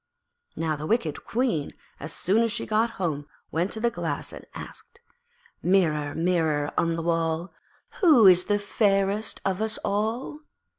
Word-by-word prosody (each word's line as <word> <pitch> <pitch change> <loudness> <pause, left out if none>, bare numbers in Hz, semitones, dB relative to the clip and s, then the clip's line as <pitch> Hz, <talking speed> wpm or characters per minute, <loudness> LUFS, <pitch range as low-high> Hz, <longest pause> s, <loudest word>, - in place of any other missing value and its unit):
Now 160 -1 -1
the 150 +1 -6
wicked 235 +5 -1
Queen, 225 - -1 0.3
as 155 - -6
soon 205 +5 +1
as 230 -1 +1
she 235 - -3
got 220 +2 +2
home, 150 -6 -2 0.2
went 175 +4 0
to 220 - -3
the 235 +1 +1
Glass - - -3
and - - -10
asked 470 - -11 0.6
'Mirror, 155 -6 +2
Mirror 160 -4 +1
on 165 0 +1
the 165 - -3
wall, 165 +1 -1 0.5
Who 300 - +6
is 180 -1 +7
fairest 205 0 0
of 195 +1 0
us 220 0 -1
all?' 220 +8 -2
190 Hz, 150 wpm, -26 LUFS, 165-220 Hz, 0.6 s, is